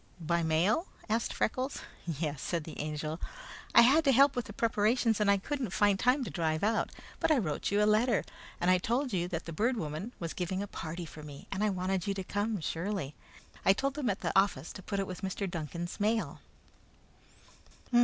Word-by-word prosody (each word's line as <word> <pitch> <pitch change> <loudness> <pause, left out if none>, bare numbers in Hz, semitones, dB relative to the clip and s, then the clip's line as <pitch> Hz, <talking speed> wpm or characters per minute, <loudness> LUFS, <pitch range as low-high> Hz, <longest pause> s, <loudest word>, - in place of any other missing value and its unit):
"By 170 +1 +1
mail?" 170 - +2 0.2
asked 225 +2 +1
Freckles. 260 +4 -1 0.3
"Yes," 150 -3 -2
said 170 -3 -1
the 160 - -9
Angel. 155 +2 -3 0.5
"I - - +11
had 285 +7 +6
to 275 - +6
help 275 +2 +6
with 245 -3 -1
the - - -8
preparations, 225 +1 +2
and 210 -1 +3
I 200 - +5
couldn't 260 +3 -3
find 205 +1 +3
time 255 +2 +3
to - - -5
drive 160 -2 0
out; 225 +2 +2 0.3
but - - +2
I 310 - +5
wrote 155 - -1
you 205 +1 +3
a - - +5
letter, 215 +2 +3 0.4
and 180 0 +3
told 250 +4 0
you 175 -2 +1
that 170 -2 -4
the 165 - -6
Bird 235 +9 +1
Woman 160 +6 -4
was 165 -2 -4
giving 185 +2 -2
a - - -5
party 170 -1 -5
for 155 -1 -10
me, 145 -2 -10
and 195 - -2
we 215 - +3
wanted 185 -1 -1
you 200 - 0
to 190 - -3
come, 205 +2 -1
surely. 165 -2 -2 0.5
I 195 - +6
told 275 +7 -1
them 280 -5 -1
at 195 - -1
the - - -1
office 195 -7 +2
to 190 - -8
put 200 +2 -3
it 195 - 0
with 185 -1 -7
Mr. 195 +1 -2
Duncan's 170 0 -5
mail." 220 +2 0
195 Hz, 205 wpm, -31 LUFS, 170-225 Hz, 0.5 s, I